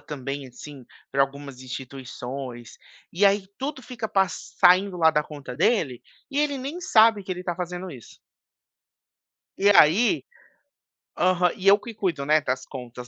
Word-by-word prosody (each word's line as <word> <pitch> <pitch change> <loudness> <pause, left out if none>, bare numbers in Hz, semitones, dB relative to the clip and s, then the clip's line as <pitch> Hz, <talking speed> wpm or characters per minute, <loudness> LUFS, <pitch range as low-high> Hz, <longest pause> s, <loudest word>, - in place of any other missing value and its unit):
também, 140 -1 -6
assim, 135 +2 -12 0.3
pra 140 - +1
algumas 140 -1 -5
instituições, 125 -1 -8 0.3
e 190 +4 +2
aí 200 -1 +2
tudo 270 0 -4
fica 230 -3 -6
pas 185 -4 -1
saindo 185 +1 +5
lá 160 -2 +5
da 150 -1 +1
conta 145 -5 -9
dele, 145 - +1 0.3
e 280 - -2
ele 295 -2 +1
nem 280 +7 -6
sabe 220 - +4
que 185 - -4
ele 180 0 -7
tá 175 - -2
fazendo 180 +1 -5
isso 125 -7 -13 1.4
E 200 - +3
aí 205 - +5 0.9
Aham. 180 -1 +2
E 195 -2 -4
eu 200 +1 +8
que 235 +1 -9
cuido, 180 -9 -2
né, 155 +1 +4
das 130 -1 -3
contas 125 -2 -9
170 Hz, 155 wpm, -24 LUFS, 135-200 Hz, 1.4 s, eu